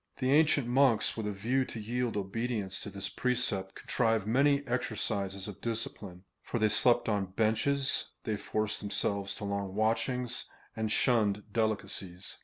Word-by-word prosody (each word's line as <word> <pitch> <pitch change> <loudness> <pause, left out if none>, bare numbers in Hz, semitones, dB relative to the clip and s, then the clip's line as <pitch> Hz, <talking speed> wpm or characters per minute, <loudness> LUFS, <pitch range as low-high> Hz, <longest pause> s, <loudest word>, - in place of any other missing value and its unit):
The 130 +1 +1
ancient 150 -2 +4
monks, 125 -3 +3
with 110 -2 -3
a - - -1
view 115 +7 +1
to 115 - -7
yield 120 +1 -1
obedience 105 0 -2
to - - -5
this 100 0 -4
precept, 110 -5 -1
contrived 115 -4 +1
many 140 +5 +3
exercises 100 -5 -2
of 105 - -8
discipline, 105 -5 -4 0.2
for - - -3
they 110 -1 +3
slept 120 +3 +3
on 100 -3 0
benches, 135 +6 +1 0.2
they 110 -3 -1
forced 110 +1 -2
themselves 100 -1 -1
to - - -8
long 100 -1 -2
watchings, 120 +3 0 0.3
and 110 -1 -1
shunned 105 -4 +2
delicacies. 100 -5 -2
110 Hz, 150 wpm, -31 LUFS, 100-125 Hz, 0.3 s, ancient